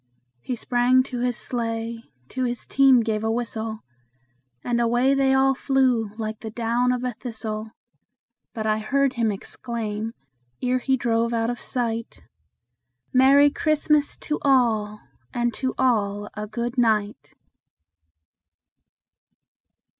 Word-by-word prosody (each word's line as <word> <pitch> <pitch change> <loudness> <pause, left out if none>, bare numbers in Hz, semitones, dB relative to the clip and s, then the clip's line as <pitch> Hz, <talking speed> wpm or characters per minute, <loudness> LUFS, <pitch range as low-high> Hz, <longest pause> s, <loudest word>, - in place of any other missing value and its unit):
He 250 - -4
sprang 245 +2 +3
to 255 -2 -6
his 245 -1 0
sleigh, 230 -1 -3 0.3
to 260 - -3
his 245 -1 -3
team 270 -3 +5
gave 220 -1 -1
a 220 - 0
whistle, 225 -1 -3 0.8
And 240 -1 0
away 240 +3 +3
they 270 -1 +3
all 265 0 +4
flew 255 -5 +1
like 220 -1 -4
the 220 - -6
down 235 +2 0
of 250 0 -2
a 250 - -1
thistle; 220 -2 -5 0.8
But 220 -1 -5
I 215 0 +1
heard 275 +4 +1
him 230 -3 +1
exclaim, 220 +1 -5 0.4
ere 255 0 +1
he 265 +1 +1
drove 235 -1 0
out 230 +1 0
of 240 - -6
sight, 230 -2 -3 0.9
"Merry 275 +3 +6
Christmas 300 -1 +1
to 300 - -2
all, 220 -6 +2 0.3
and 240 -1 0
to 260 +3 -2
all 205 -5 +1
a 210 0 -5
good 235 +4 -3
night!" 210 - 0
240 Hz, 130 wpm, -24 LUFS, 220-255 Hz, 0.9 s, Merry